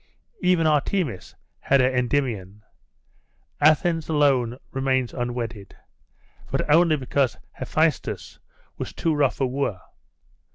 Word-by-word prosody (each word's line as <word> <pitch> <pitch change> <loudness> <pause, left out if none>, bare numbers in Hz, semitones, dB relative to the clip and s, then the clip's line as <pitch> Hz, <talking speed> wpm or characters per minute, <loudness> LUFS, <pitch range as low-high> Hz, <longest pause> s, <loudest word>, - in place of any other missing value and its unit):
Even 180 -3 +3
Artemis 150 - 0 0.2
has 140 - +2
her 125 - +4
Endymion; 120 -6 -1 1.0
Athens 155 +2 +3
alone 135 -6 +2
remains 130 -2 0
unwedded; 120 -4 -4 0.7
but - - -1
only 165 -1 +5
because 130 -2 0
Hephaestus - - -1 0.4
was - - -5
too 165 - 0
rough 145 -3 +1
a 135 - +2
wooer. 130 -7 -2
135 Hz, 100 wpm, -24 LUFS, 120-150 Hz, 1.0 s, only